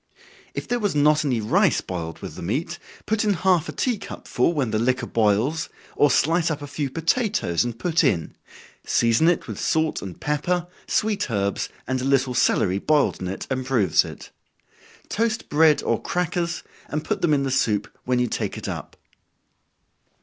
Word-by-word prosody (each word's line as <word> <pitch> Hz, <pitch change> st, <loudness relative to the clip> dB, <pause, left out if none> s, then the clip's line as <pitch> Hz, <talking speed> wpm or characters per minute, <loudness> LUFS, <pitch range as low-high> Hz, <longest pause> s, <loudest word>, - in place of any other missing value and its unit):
If -, -, -4 dB
there 245 Hz, 0 st, 0 dB
was 205 Hz, -8 st, -1 dB
not 150 Hz, +1 st, +4 dB
any 130 Hz, -6 st, 0 dB
rice 105 Hz, -, +3 dB
boiled 80 Hz, -3 st, -6 dB
with -, -, -6 dB
the -, -, -9 dB
meat, 150 Hz, -, -2 dB, 0.3 s
put 220 Hz, +1 st, +1 dB
in 210 Hz, -1 st, +2 dB
half 180 Hz, -2 st, +2 dB
a -, -, -2 dB
tea 245 Hz, -5 st, -1 dB
cup 200 Hz, -, -9 dB
full, 125 Hz, +7 st, +2 dB
when 140 Hz, -9 st, -1 dB
the 110 Hz, -, +1 dB
liquor 125 Hz, +2 st, +1 dB
boils, 115 Hz, +8 st, +1 dB, 0.3 s
or 145 Hz, -, +4 dB
slice 165 Hz, +6 st, +2 dB
up 150 Hz, -2 st, -3 dB
a -, -, -4 dB
few 145 Hz, 0 st, -3 dB
potatoes 165 Hz, -, +1 dB
and 120 Hz, -1 st, -4 dB
put 165 Hz, +6 st, +1 dB
in 85 Hz, -5 st, 0 dB, 0.5 s
season 115 Hz, +7 st, +3 dB
it 175 Hz, -, +2 dB
with -, -, -6 dB
salt 160 Hz, -1 st, 0 dB
and 95 Hz, -3 st, -8 dB
pepper, 170 Hz, +4 st, 0 dB, 0.2 s
sweet 215 Hz, -8 st, 0 dB
herbs, 100 Hz, -3 st, -1 dB, 0.2 s
and 130 Hz, -1 st, -1 dB
a -, -, -2 dB
little 135 Hz, -2 st, +2 dB
celery 95 Hz, -5 st, +2 dB
boiled 150 Hz, +4 st, +2 dB
in 90 Hz, -, -3 dB
it 95 Hz, -, -5 dB
improves 130 Hz, -, +2 dB
it. -, -, -10 dB, 0.8 s
Toast 225 Hz, 0 st, -1 dB
bread 155 Hz, 0 st, +4 dB
or -, -, 0 dB
crackers, 175 Hz, -1 st, -2 dB, 0.2 s
and 150 Hz, +1 st, -3 dB
put -, -, -2 dB
them 170 Hz, -, +2 dB
in 140 Hz, -2 st, +3 dB
the 135 Hz, -, -1 dB
soup 105 Hz, -6 st, +1 dB, 0.2 s
when 125 Hz, 0 st, +1 dB
you 125 Hz, -, +2 dB
take 120 Hz, -, -3 dB
it -, -, -6 dB
up. -, -, -6 dB
145 Hz, 185 wpm, -23 LUFS, 115-170 Hz, 0.8 s, not